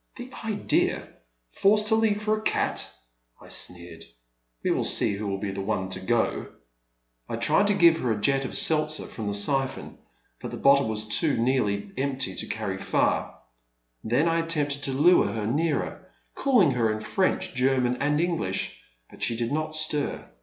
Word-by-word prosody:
The 250 Hz, +1 st, -9 dB
idea! 215 Hz, -2 st, 0 dB, 0.4 s
forced 210 Hz, -, +3 dB
to 220 Hz, -, +4 dB
leave 215 Hz, -2 st, +1 dB
for 215 Hz, 0 st, +2 dB
a 215 Hz, -, -6 dB
cat! -, -, -1 dB, 0.3 s
" -, -, -43 dB
I -, -, -15 dB
sneered, 85 Hz, -2 st, -5 dB, 0.6 s
we -, -, +1 dB
will -, -, 0 dB
see -, -, +3 dB
who 100 Hz, +1 st, -4 dB
will 100 Hz, -1 st, -2 dB
be 100 Hz, 0 st, -4 dB
the 95 Hz, 0 st, -5 dB
one 95 Hz, -2 st, -2 dB
to 95 Hz, -, -1 dB
go! 110 Hz, +5 st, 0 dB, 0.4 s
" -, -, -44 dB
I -, -, -2 dB
tried 205 Hz, -, +3 dB
to 205 Hz, -, +2 dB
give 170 Hz, -3 st, +5 dB
her 125 Hz, -, -1 dB
a 105 Hz, -, -1 dB
jet 135 Hz, +5 st, +2 dB
of 130 Hz, -, -3 dB
seltzer 155 Hz, -1 st, +1 dB
from 110 Hz, -3 st, -7 dB
the 100 Hz, -, 0 dB
siphon, 135 Hz, +5 st, -1 dB, 0.4 s
but -, -, -5 dB
the -, -, -7 dB
bottle 140 Hz, -2 st, +4 dB
was 110 Hz, 0 st, -2 dB
too 145 Hz, +8 st, +1 dB
nearly 105 Hz, -5 st, 0 dB
empty 135 Hz, -1 st, -1 dB
to -, -, -2 dB
carry 100 Hz, -4 st, -4 dB
far. -, -, -1 dB, 0.6 s
Then 125 Hz, +9 st, +1 dB
I 165 Hz, 0 st, +2 dB
attempted 150 Hz, -4 st, -1 dB
to 135 Hz, -, -2 dB
lure 160 Hz, +7 st, +4 dB
her 110 Hz, -2 st, -3 dB
nearer, 150 Hz, +6 st, -2 dB, 0.2 s
calling 240 Hz, -, +3 dB
her 115 Hz, -3 st, +1 dB
in 110 Hz, 0 st, -4 dB
French, 185 Hz, -, -1 dB
German, 125 Hz, -1 st, +1 dB
and 150 Hz, +2 st, 0 dB
English, 165 Hz, -, -2 dB, 0.3 s
but -, -, -17 dB
she 115 Hz, -, +1 dB
did 115 Hz, 0 st, -2 dB
not 155 Hz, +1 st, -2 dB
stir. 155 Hz, -2 st, 0 dB
135 Hz, 185 wpm, -26 LUFS, 105-160 Hz, 0.6 s, give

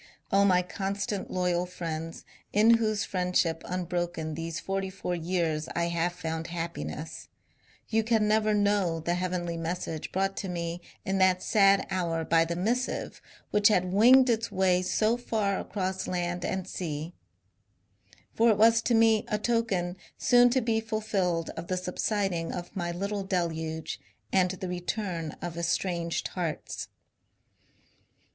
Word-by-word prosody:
O 195 Hz, +1 st, +5 dB
my 180 Hz, -2 st, +4 dB
constant, 195 Hz, +2 st, -3 dB
loyal 180 Hz, -1 st, 0 dB
friends, 165 Hz, -2 st, -5 dB, 0.3 s
in 225 Hz, +3 st, +6 dB
whose 215 Hz, -2 st, 0 dB
friendship 180 Hz, -3 st, 0 dB
unbroken 175 Hz, -3 st, -2 dB
these 165 Hz, 0 st, -4 dB
forty 195 Hz, 0 st, -2 dB
four 190 Hz, -1 st, -4 dB
years 165 Hz, -3 st, -1 dB
I 170 Hz, 0 st, +1 dB
have 170 Hz, +1 st, 0 dB
found 160 Hz, -2 st, -4 dB
happiness, 170 Hz, -2 st, -5 dB, 0.6 s
you 225 Hz, 0 st, +1 dB
can 220 Hz, -1 st, +2 dB
never 215 Hz, 0 st, +3 dB
know 200 Hz, -5 st, +2 dB
the 170 Hz, +2 st, -1 dB
heavenly 175 Hz, -1 st, -2 dB
message 165 Hz, -1 st, -4 dB
brought 195 Hz, +1 st, 0 dB
to 195 Hz, -, -3 dB
me 170 Hz, 0 st, -3 dB, 0.2 s
in 195 Hz, 0 st, 0 dB
that 185 Hz, -1 st, +3 dB
sad 200 Hz, -2 st, +4 dB
hour 170 Hz, -3 st, -1 dB
by 165 Hz, 0 st, +4 dB
the 170 Hz, +1 st, -3 dB
missive 235 Hz, +8 st, -2 dB, 0.3 s
which 210 Hz, 0 st, +5 dB
had 185 Hz, -3 st, +2 dB
winged 255 Hz, +6 st, +7 dB
its 225 Hz, -2 st, 0 dB
way 185 Hz, -1 st, +3 dB
so 215 Hz, +5 st, +1 dB
far 215 Hz, -5 st, -1 dB
across 190 Hz, -2 st, -3 dB
land 175 Hz, -1 st, -2 dB
and 190 Hz, -1 st, -2 dB
sea 160 Hz, -2 st, -4 dB
I 95 Hz, +2 st, -35 dB, 0.2 s
For 230 Hz, +1 st, +4 dB
it 215 Hz, -, +4 dB
was 225 Hz, +1 st, +6 dB
to 235 Hz, -, +2 dB
me 225 Hz, -1 st, +4 dB
a 210 Hz, -, 0 dB
token 210 Hz, -5 st, 0 dB, 0.2 s
soon 245 Hz, 0 st, +5 dB
to 260 Hz, +2 st, +2 dB
be 225 Hz, -1 st, +1 dB
fulfilled 200 Hz, -6 st, -1 dB
of 165 Hz, +1 st, -7 dB
the 185 Hz, -, -1 dB
subsiding 180 Hz, -1 st, -1 dB
of 175 Hz, +3 st, -6 dB
my 175 Hz, -2 st, -2 dB
little 200 Hz, +3 st, -3 dB
deluge 160 Hz, -4 st, -2 dB, 0.3 s
and 185 Hz, -1 st, +4 dB
the 185 Hz, +1 st, -5 dB
return 180 Hz, -2 st, -3 dB
of 170 Hz, -1 st, -4 dB
estranged 170 Hz, 0 st, -1 dB
hearts. 170 Hz, -4 st, -4 dB
180 Hz, 150 wpm, -28 LUFS, 170-205 Hz, 0.6 s, winged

